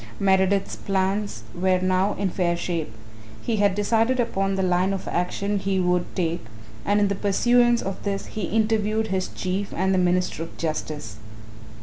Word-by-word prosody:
Meredith's 195 Hz, 0 st, +2 dB
plans 195 Hz, +1 st, -1 dB
were 185 Hz, +1 st, +2 dB
now 185 Hz, +2 st, +1 dB
in 195 Hz, -2 st, -1 dB
fair 170 Hz, -2 st, 0 dB
shape. 170 Hz, -7 st, -3 dB, 0.5 s
He 230 Hz, -2 st, 0 dB
had 200 Hz, -2 st, +3 dB
decided 225 Hz, +5 st, +2 dB
upon 195 Hz, -5 st, 0 dB
the 190 Hz, -, 0 dB
line 185 Hz, +1 st, +2 dB
of 195 Hz, -, -5 dB
action 200 Hz, +3 st, -1 dB
he 195 Hz, 0 st, 0 dB
would 180 Hz, -1 st, +2 dB
take 170 Hz, -4 st, -1 dB, 0.4 s
and 205 Hz, +1 st, +2 dB
in 205 Hz, -, +3 dB
the 200 Hz, -, 0 dB
pursuance 240 Hz, +5 st, +3 dB
of 195 Hz, -1 st, -4 dB
this 200 Hz, -1 st, -2 dB
he 215 Hz, -4 st, -4 dB
interviewed 220 Hz, +1 st, +1 dB
his 190 Hz, -1 st, 0 dB
Chief 195 Hz, +2 st, -3 dB
and 190 Hz, +2 st, +1 dB
the 185 Hz, -, +3 dB
Minister 180 Hz, -2 st, +1 dB
of 165 Hz, -, -7 dB
Justice. 155 Hz, -8 st, -4 dB
195 Hz, 165 wpm, -24 LUFS, 180-205 Hz, 0.5 s, had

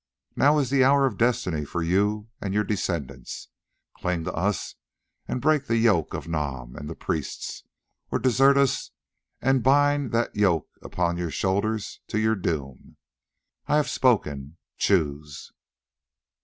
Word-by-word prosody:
Now 145 Hz, +2 st, +4 dB
is 135 Hz, -4 st, 0 dB
the 135 Hz, -2 st, +4 dB
hour 140 Hz, +1 st, +5 dB
of 120 Hz, -7 st, -2 dB
destiny 115 Hz, -10 st, +1 dB
for 80 Hz, +4 st, -3 dB
you 105 Hz, +5 st, +1 dB
and 100 Hz, -1 st, -3 dB
your 105 Hz, -, +3 dB
descendants: 80 Hz, -, -4 dB, 0.5 s
cling 90 Hz, -2 st, -2 dB
to -, -, -4 dB
us 95 Hz, +3 st, -1 dB, 0.5 s
and -, -, -2 dB
break 150 Hz, +1 st, +2 dB
the 115 Hz, -, +2 dB
yoke 110 Hz, -8 st, +2 dB
of 75 Hz, -, -6 dB
Nam 70 Hz, -7 st, -4 dB
and 75 Hz, -, -7 dB
the 80 Hz, -, -6 dB
priests, 75 Hz, -4 st, -4 dB, 0.5 s
or -, -, 0 dB
desert 135 Hz, +2 st, +4 dB
us 140 Hz, -2 st, +1 dB, 0.5 s
and 135 Hz, 0 st, +3 dB
bind 145 Hz, 0 st, +3 dB
that 115 Hz, 0 st, 0 dB
yoke 95 Hz, -7 st, +2 dB
upon 85 Hz, -1 st, -1 dB
your 85 Hz, -1 st, -2 dB
shoulders 100 Hz, +4 st, -1 dB
to -, -, -2 dB
your 110 Hz, +1 st, +2 dB
doom. 75 Hz, -9 st, -4 dB, 0.7 s
I 145 Hz, -, +2 dB
have 150 Hz, -2 st, +2 dB
spoken—choose." 75 Hz, -, -1 dB
100 Hz, 140 wpm, -25 LUFS, 80-125 Hz, 0.7 s, hour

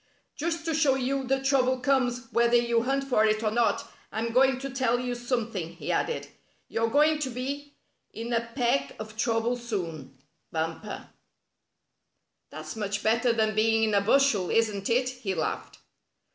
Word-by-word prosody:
"Just 330 Hz, +2 st, -3 dB
to 325 Hz, -, 0 dB
show 295 Hz, -4 st, +3 dB
you 265 Hz, +1 st, -1 dB
that 270 Hz, +1 st, 0 dB
trouble 260 Hz, -2 st, +3 dB
comes 250 Hz, -2 st, +1 dB
whether 235 Hz, 0 st, +3 dB
you 235 Hz, -1 st, +3 dB
hunt 270 Hz, +3 st, 0 dB
for 250 Hz, -5 st, +2 dB
it 215 Hz, 0 st, +2 dB
or 215 Hz, -, +1 dB
not, 235 Hz, +1 st, +1 dB, 0.2 s
I'm 225 Hz, +2 st, -2 dB
going 265 Hz, +1 st, +4 dB
to 275 Hz, -, -4 dB
tell 250 Hz, -2 st, +1 dB
you 250 Hz, 0 st, -2 dB
some 240 Hz, -1 st, -2 dB
thing," 170 Hz, -5 st, -4 dB
he -, -, -4 dB
added. 475 Hz, -, -1 dB, 0.2 s
" -, -, -40 dB
You're 225 Hz, 0 st, 0 dB
going 300 Hz, +4 st, +4 dB
to 280 Hz, -3 st, -2 dB
be 280 Hz, +4 st, -5 dB, 0.4 s
in 230 Hz, +2 st, -5 dB
a 230 Hz, -, +2 dB
peck 235 Hz, -, +1 dB
of 215 Hz, 0 st, -8 dB
trouble 225 Hz, +1 st, +1 dB
soon. 165 Hz, -, -5 dB, 0.3 s
Bumper." 165 Hz, +6 st, -4 dB, 0.7 s
" -, -, -53 dB
That's -, -, -8 dB
much 205 Hz, -1 st, -3 dB
better 230 Hz, +2 st, +3 dB
than 220 Hz, -1 st, +1 dB
being 225 Hz, +1 st, +3 dB
in 215 Hz, -1 st, +2 dB
a 200 Hz, -, +4 dB
bushel, 220 Hz, -4 st, +3 dB
isn't 210 Hz, -3 st, +1 dB
it?" 250 Hz, +2 st, +2 dB
he 250 Hz, -7 st, -4 dB
laughed. 160 Hz, -, -3 dB
235 Hz, 175 wpm, -27 LUFS, 215-265 Hz, 0.7 s, going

